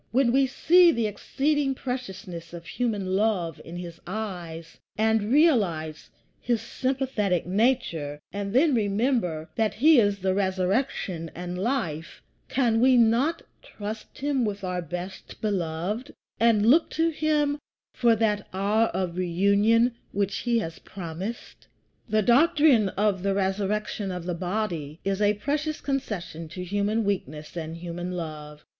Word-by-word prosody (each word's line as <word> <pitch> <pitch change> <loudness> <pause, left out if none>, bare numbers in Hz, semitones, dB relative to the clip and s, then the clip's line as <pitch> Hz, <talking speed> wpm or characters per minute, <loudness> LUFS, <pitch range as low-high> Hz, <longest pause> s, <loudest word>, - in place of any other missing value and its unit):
When 245 0 +3
we 270 +1 +4
see 345 +6 +5
the 230 -6 0
exceeding 270 +6 0
preciousness 190 -10 -6
of 170 0 -9
human 200 -2 -1
love 190 -6 0
in 170 +1 -8
his 170 -1 -8
eyes, 175 -5 -6 0.2
and 220 0 +2
realize 195 - +2 0.3
his 235 -2 0
sympathetic 250 -6 -1
nature, 180 - 0
and 200 0 -3
then 280 +6 +4
remember 205 - 0
that 220 -1 +1
he 295 +4 +6
is 205 -3 +1
RESURRECTION 190 -1 0
AND 180 +1 -5
LIFE, 190 - -2 0.3
can 235 -4 +2
we 255 0 +6
not 240 +8 +3 0.2
trust 215 +1 -8
him 280 -2 0
with 205 -2 -3
our 180 -1 -2
best 180 +3 -7
beloved, 200 - -2 0.2
and 225 -2 +4
look 300 +9 +5
to 325 +1 +1
him 300 -2 +1 0.3
for 235 -2 +3
that 210 -2 0
hour 205 +4 +2
of 180 -2 -2
reunion 200 +7 +3 0.2
which 200 0 0
he 240 -1 +1
has 165 -7 -3
promised? 185 +5 -7 0.4
The 215 0 +2
doctrine 265 -3 +5
of 200 -1 0
the 195 0 0
resurrection 200 +1 -1
of 180 -1 -5
the 180 - -2
body 175 -4 -3
is 195 +1 0
a 205 0 +3
precious 295 +8 -2
concession 195 - -4
to 180 +3 -7
human 205 +4 0
weakness 155 -7 -3
and 165 -1 -5
human 175 +1 -5
love. 150 -3 -7
205 Hz, 140 wpm, -26 LUFS, 180-240 Hz, 0.4 s, he